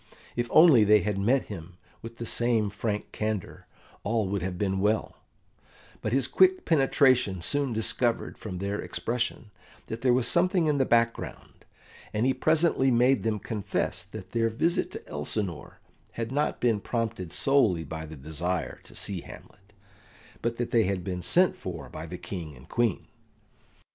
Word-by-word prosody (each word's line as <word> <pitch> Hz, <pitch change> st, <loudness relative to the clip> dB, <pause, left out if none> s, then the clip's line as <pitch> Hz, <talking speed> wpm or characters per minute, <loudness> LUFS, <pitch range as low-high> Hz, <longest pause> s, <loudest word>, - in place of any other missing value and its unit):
If 120 Hz, 0 st, -1 dB
only 155 Hz, -9 st, +7 dB
they 105 Hz, 0 st, +5 dB
had 100 Hz, +1 st, -1 dB
met 125 Hz, +7 st, +2 dB
him 90 Hz, -3 st, -9 dB, 0.2 s
with 115 Hz, 0 st, -9 dB
the 115 Hz, -, -5 dB
same 115 Hz, -3 st, +1 dB
frank 105 Hz, 0 st, -3 dB
candour, 110 Hz, -3 st, -4 dB, 0.4 s
all 110 Hz, -1 st, 0 dB
would 100 Hz, -1 st, -1 dB
have 90 Hz, 0 st, -3 dB
been 95 Hz, 0 st, 0 dB
well; 105 Hz, +3 st, 0 dB, 0.8 s
but 110 Hz, -, -2 dB
his 130 Hz, 0 st, +2 dB
quick 375 Hz, -1 st, +4 dB
penetration 130 Hz, -, +3 dB
soon 140 Hz, +5 st, +1 dB
discovered 115 Hz, +1 st, 0 dB
from 95 Hz, -4 st, -7 dB
their 100 Hz, +2 st, -2 dB
expression 115 Hz, -2 st, -3 dB, 0.3 s
that 115 Hz, +1 st, -6 dB
there 130 Hz, 0 st, +3 dB
was 125 Hz, -1 st, +3 dB
something 180 Hz, +3 st, +3 dB
in 150 Hz, -2 st, +1 dB
the 135 Hz, -, +2 dB
background, 115 Hz, 0 st, -1 dB, 0.5 s
and 110 Hz, +3 st, +1 dB
he 130 Hz, -, +3 dB
presently 155 Hz, -4 st, +2 dB
made 125 Hz, +2 st, +4 dB
them 110 Hz, -1 st, 0 dB
confess 100 Hz, -1 st, -2 dB
that 95 Hz, +1 st, -10 dB
their 115 Hz, -1 st, +1 dB
visit 160 Hz, +10 st, 0 dB
to -, -, -8 dB
Elsinore 85 Hz, +3 st, -4 dB, 0.3 s
had 115 Hz, 0 st, -4 dB
not 145 Hz, +2 st, 0 dB
been 115 Hz, -4 st, +2 dB
prompted 115 Hz, -8 st, -3 dB
solely 115 Hz, -12 st, +2 dB
by 80 Hz, +1 st, -6 dB
the 80 Hz, 0 st, -9 dB
desire 80 Hz, +2 st, -3 dB
to -, -, -11 dB
see 95 Hz, -4 st, -3 dB
Hamlet, 100 Hz, +2 st, -14 dB, 0.7 s
but 115 Hz, 0 st, -2 dB
that 120 Hz, -1 st, -3 dB
they 115 Hz, -3 st, +4 dB
had 95 Hz, -1 st, -1 dB
been 90 Hz, -1 st, -4 dB
sent 180 Hz, -, +3 dB
for 90 Hz, -3 st, -7 dB
by 80 Hz, +1 st, -7 dB
the 90 Hz, +2 st, -6 dB
King 85 Hz, -4 st, -7 dB
and 65 Hz, +1 st, -16 dB
Queen. 120 Hz, -5 st, 0 dB
110 Hz, 165 wpm, -27 LUFS, 95-125 Hz, 0.8 s, only